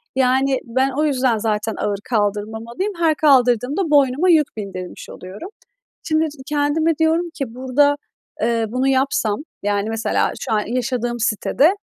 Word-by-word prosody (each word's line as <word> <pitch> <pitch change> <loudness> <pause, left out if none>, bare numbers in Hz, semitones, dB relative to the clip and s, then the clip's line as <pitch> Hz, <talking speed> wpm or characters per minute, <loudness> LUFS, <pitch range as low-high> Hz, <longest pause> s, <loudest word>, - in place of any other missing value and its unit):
Yani 265 +1 +2
ben 260 +3 +1
o 295 +4 -1
yüzden 255 -5 +1
zaten 215 0 -1
ağır 200 -1 -2
kaldırmamalıyım. 220 - -2
Her 320 -2 +3
kaldırdığımda 260 - +3
boynuma 285 +5 +3
yük 305 -8 +3
bindirmiş 185 -3 -7
oluyorum. 195 - -9 0.5
Şimdi, 315 0 +1 0.2
kendime 300 +2 +1
diyorum 325 +2 +1
ki 250 -4 -5
burada, 265 +3 +2 0.5
eee, 230 0 +1
bunu 255 +4 0
yapsam, 260 -6 +1 0.2
yani, 205 +1 0
mesela 225 0 0
şu - - -5
an 210 - +2
yaşadığım 245 0 -2
sitede, 265 - +2
255 Hz, 135 wpm, -20 LUFS, 220-290 Hz, 0.5 s, Her